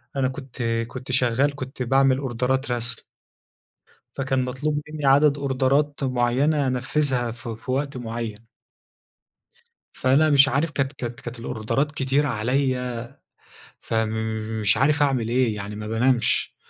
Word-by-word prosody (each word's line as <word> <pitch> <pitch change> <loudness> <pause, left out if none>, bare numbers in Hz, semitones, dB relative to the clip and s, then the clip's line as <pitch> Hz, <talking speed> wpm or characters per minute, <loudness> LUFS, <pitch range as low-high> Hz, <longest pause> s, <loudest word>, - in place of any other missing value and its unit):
أنا 135 -1 +1
كنت 130 -2 -8 0.3
كنت 130 +1 -7
شغال، 130 +3 +2
كنت 130 -1 -5
بعمل 135 +1 +3
أوردرات 130 0 -1
رسم 120 0 -1 1.2
فكان 130 -1 0
مطلوب 145 +4 -2
مني 150 -2 -4
عدد 140 +1 +5
أوردرات 140 +1 +1
معينة 130 +4 +1
أنفذها 125 -1 0
في 115 -1 -7
في 130 +3 -8
وقت 140 +1 -1
معين. 115 -2 -5 1.5
فأنا 140 +4 +3
مش 140 0 +6
عارف 145 +3 0
كانت 135 -1 -1
كانت 120 -3 -6
كانت 120 0 -7
الأوردرات 125 +6 -2
كتيرة 140 +1 +1
عليَّ، 125 +1 -1 0.8
فمش 110 -1 -1
عارف 145 +2 +3
أعمل 130 -5 +1
إيه 120 -3 +1
يعني 100 +1 -6
ما 105 0 -6
بانامش، 120 +2 +2
130 Hz, 125 wpm, -24 LUFS, 120-140 Hz, 1.5 s, مش